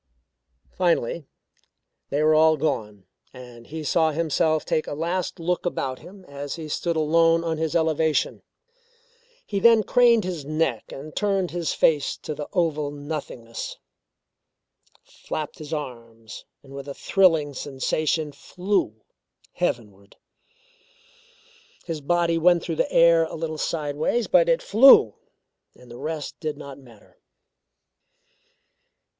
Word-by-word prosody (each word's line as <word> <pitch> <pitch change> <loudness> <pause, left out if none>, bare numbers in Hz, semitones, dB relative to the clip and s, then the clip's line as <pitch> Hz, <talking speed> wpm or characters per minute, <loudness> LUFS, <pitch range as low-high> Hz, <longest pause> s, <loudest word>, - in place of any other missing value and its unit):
Finally 170 -4 0 0.8
they 145 +2 0
were 155 0 +4
all 155 0 +5
gone 105 -10 -3 0.3
and 120 -2 -12
he 160 0 -6
saw 160 +2 +2
himself 155 0 0
take 155 - -1
a - - -4
last 170 +4 -3
look 175 +2 -1
about 135 -7 -3
him 190 0 -14
as 140 -1 -6
he 160 -2 -7
stood 170 +3 -2
alone 165 +2 +3
on 165 -2 -2
his 160 0 -2
elevation. 160 -3 +1 1.0
He 200 - -2
then 225 +1 +5
craned 235 0 +4
his 180 -5 -4
neck 155 -5 -2
and 150 +3 -9
turned 195 -3 0
his 170 -2 -2
face 150 -4 +2
to 155 - -6
the 150 0 -6
oval 155 -5 0
nothingness 145 -6 -6 1.3
flapped 155 -2 -7
his 155 0 -9
arms, 115 -7 -7 0.2
and 135 -1 -14
with 140 0 -8
a 140 - -6
thrilling 165 -7 +2
sensation 150 +3 -2
flew 180 - -2 0.5
heavenward. 100 -3 -4 1.7
His 165 -3 -5
body 170 +2 +1
went 175 0 +4
through 165 -2 -4
the - - 0
air 165 -1 +5
a - - -7
little 160 -1 -4
sideways 155 +8 -1
but - - +4
it - - +2
flew, 220 - +7 0.6
and 125 -1 -17
the 120 - -10
rest 155 0 -5
did 155 -3 -4
not 140 -2 -10
matter. 120 -6 -19
155 Hz, 130 wpm, -24 LUFS, 140-170 Hz, 1.7 s, flew